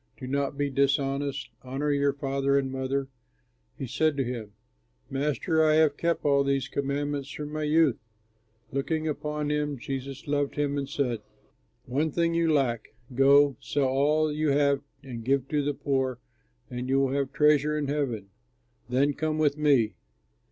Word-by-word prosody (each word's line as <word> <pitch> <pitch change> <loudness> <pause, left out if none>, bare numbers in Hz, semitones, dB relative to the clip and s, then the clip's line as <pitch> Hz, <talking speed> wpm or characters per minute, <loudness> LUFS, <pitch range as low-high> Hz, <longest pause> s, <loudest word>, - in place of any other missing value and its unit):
Do 130 - -7
not 140 +1 -1
be 145 -1 0
dishonest. 140 +1 0
Honor 135 +3 -2
your 140 0 +2
father 140 0 0
and 135 -1 0
mother.'" 135 +1 -2 0.7
He - - -4
said 145 +4 +1
to 135 - +2
him, 115 -4 -5 0.6
"Master, 150 +3 +1
I 155 -1 +4
have 155 -2 +4
kept 170 0 -1
all 140 -1 +4
these 140 -1 0
commands 140 0 -2
from 150 +1 -6
my 155 - -2
youth." 155 -3 +3 0.7
Looking 155 +4 -1
upon 150 0 -2
him, 150 -1 -1
Jesus 135 +2 -6
loved 145 -1 -1
him 145 -1 0
and 140 -1 -3
said, 125 -6 -1 0.7
"One 145 +6 0
thing 170 +2 +1
you 165 -1 +2
lack; 120 -7 0 0.2
go, 140 +2 +5
sell 135 +2 0
all 150 +4 +2
that - - -3
you 155 0 0
have 140 0 +3 0.2
and 120 -4 -7
give 135 +1 +1
to 150 -1 +1
the 145 0 -1
poor, 130 -3 -1 0.5
and 125 +2 -5
you 135 +1 +3
will 135 -1 +2
have 140 -1 -1
treasure 150 0 +3
in 145 -2 -1
heaven. 130 -9 -2 0.6
Then 140 +3 +2
come 155 +1 -1
with 150 -2 +2
me." 140 -8 +3
140 Hz, 165 wpm, -27 LUFS, 135-150 Hz, 0.7 s, go